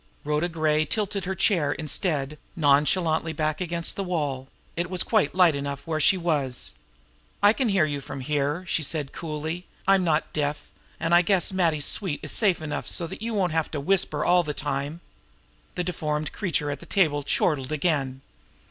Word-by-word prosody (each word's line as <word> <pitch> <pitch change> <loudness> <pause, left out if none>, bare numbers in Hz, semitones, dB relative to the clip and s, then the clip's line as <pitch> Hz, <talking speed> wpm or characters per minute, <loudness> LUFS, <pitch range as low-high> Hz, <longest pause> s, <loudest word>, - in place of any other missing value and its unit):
Rhoda 150 +4 0
Gray 155 -2 +1
tilted 200 +1 -2
her 190 +1 -2
chair, 165 -7 +2
instead, 150 -2 -2 0.2
nonchalantly 160 +2 +2
back 155 +2 -1
against 170 -1 -2
the 200 - -2
wall 145 -8 -2 0.3
it 170 +1 -2
was 185 -2 0
quite 145 - +1
light 180 -3 +6
enough 140 0 -4
where 160 -2 -1
she 190 +5 +4
was! 145 -8 -1 0.7
"I 205 +1 +7
can 250 -1 0
hear 190 -6 +3
you 145 -2 -3
from 135 - -7
here," 145 +5 -1
she 165 - 0
said 150 -2 -2
coolly. 160 +2 -5 0.2
"I'm 195 -1 +5
not 160 -2 0
deaf, 145 -1 -2 0.3
and 165 +1 0
I 175 - +8
guess 185 0 +2
Matty's 165 -6 +2
suite 185 -8 0
is - - -4
safe 190 -7 +2
enough 150 -1 -4
so 170 - 0
that 165 - -8
you 230 0 -2
won't 185 -4 +1
have 160 -1 0
to 150 - -4
whisper 155 -1 +1
all 180 0 +5
the 150 -3 -4
time!" 145 +3 -3 0.7
The 180 - -1
deformed 155 -4 -2
creature 155 -7 -1
at 140 - -5
the - - -13
table 155 -7 +2
chortled 145 -1 0
again. 140 -4 0
160 Hz, 185 wpm, -25 LUFS, 145-180 Hz, 0.7 s, I